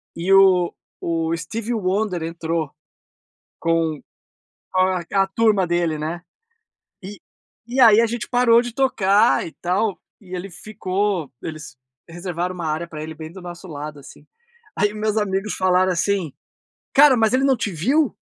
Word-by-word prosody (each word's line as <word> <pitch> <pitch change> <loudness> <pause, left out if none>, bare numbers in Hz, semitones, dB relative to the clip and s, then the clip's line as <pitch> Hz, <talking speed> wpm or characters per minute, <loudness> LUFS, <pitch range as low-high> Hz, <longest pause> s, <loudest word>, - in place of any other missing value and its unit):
e 175 +3 -2
o 185 -3 +5 0.3
o 165 0 -1
Steve 225 +7 -4
Wonder 190 -3 -1
entrou, 165 -2 -3 0.9
com 165 -3 0 0.7
com 185 - +2
a 185 -1 +2
a 195 0 +4
turma 205 -2 +2
dele, 170 -2 0
né. 165 +3 -4 0.8
E 200 +2 -9 0.5
e 255 +3 -2
aí, 225 -2 +7
a 230 - +2
gente 235 0 -4
parou 240 -1 +4
de 245 -1 -6
tocar 200 - +3
e - - -9
tal, 190 +3 0 0.2
e 185 -2 -8
ele 185 +2 -6
ficou 190 -3 -3
eles 155 -4 -8 0.3
reservaram 175 +1 -4
uma 170 -2 -5
área 160 +3 -2
para 155 -2 -8
ele 160 0 -7
bem 160 0 -9
do 190 0 -11
nosso 175 +1 -9
lado, 150 -1 -7
assim. 140 - -15 0.5
Aí 205 0 +1
meus 215 0 -1
amigos 200 0 -1
falaram 185 0 +2
assim, 180 -3 -1 0.6
cara, 280 -2 +7
mas 225 0 +2
ele 265 - +3
não 265 -2 +3
te 205 -3 -3
viu? 265 - +1
185 Hz, 155 wpm, -21 LUFS, 165-215 Hz, 0.9 s, aí